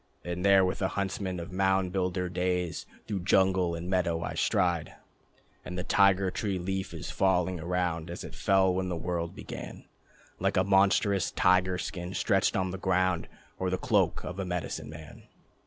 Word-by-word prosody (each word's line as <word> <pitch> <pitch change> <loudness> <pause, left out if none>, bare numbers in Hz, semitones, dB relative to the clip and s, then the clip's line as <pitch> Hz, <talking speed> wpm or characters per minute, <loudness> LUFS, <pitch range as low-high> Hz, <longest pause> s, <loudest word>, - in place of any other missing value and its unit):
And 90 +1 -3
there 100 -1 +6
with 90 - -2
the - - +1
huntsmen 95 -2 -3
of 85 +1 -7
mound 95 0 +1
builder 90 -1 -1
days 90 -1 -2 0.2
Through 105 -3 -3
jungle 95 -1 +2
and 85 +1 -6
meadow 85 -3 0
I - - -3
stride. 85 -3 0 0.7
And 90 - -6
the 90 - -2
Tiger 100 -1 +3
Tree 100 -2 -2
leaf 95 +2 -3
is - - -6
falling 95 -2 +1
around 85 -1 -2
As 85 - -6
it - - -9
fell 95 -1 +3
when 95 0 -1
the 90 - -2
world 85 0 -3
began: - - -8 0.5
Like - - 0
a - - +4
monstrous 100 0 +3
tiger 90 0 +3
skin, 90 0 -5
stretched - - +2
on 95 -1 0
the 95 - -6
ground, 95 -2 +1 0.3
Or 95 - 0
the 95 - 0
cloak - - +1
of 90 +2 -6
a - - -1
medicine 90 -4 -4
man. 80 0 -11
90 Hz, 175 wpm, -29 LUFS, 90-95 Hz, 0.7 s, there